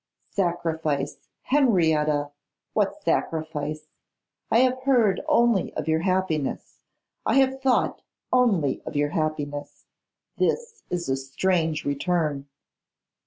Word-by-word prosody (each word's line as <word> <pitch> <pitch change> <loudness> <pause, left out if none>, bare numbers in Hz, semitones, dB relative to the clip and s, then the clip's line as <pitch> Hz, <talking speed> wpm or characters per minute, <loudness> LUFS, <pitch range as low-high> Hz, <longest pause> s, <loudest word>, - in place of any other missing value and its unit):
'Sacrifice, 160 -6 -2
Henrietta! 160 - +2 0.4
What - - 0
sacrifice? 155 -1 -2 0.6
I 230 - +5
have 255 0 +2
heard 240 -8 +3
only 235 - +3
of - - -3
your 160 0 +2
happiness; 185 -5 -1 0.4
I - - +1
have 265 0 +3
thought 265 -2 +1 0.3
only 200 - +2
of - - -5
your 145 0 +1
happiness. 145 -2 -3 0.5
This 470 -2 -1
is 175 -1 -2
a 135 - +1
strange 160 +4 0
return. 145 -1 -1
165 Hz, 105 wpm, -25 LUFS, 150-230 Hz, 0.6 s, I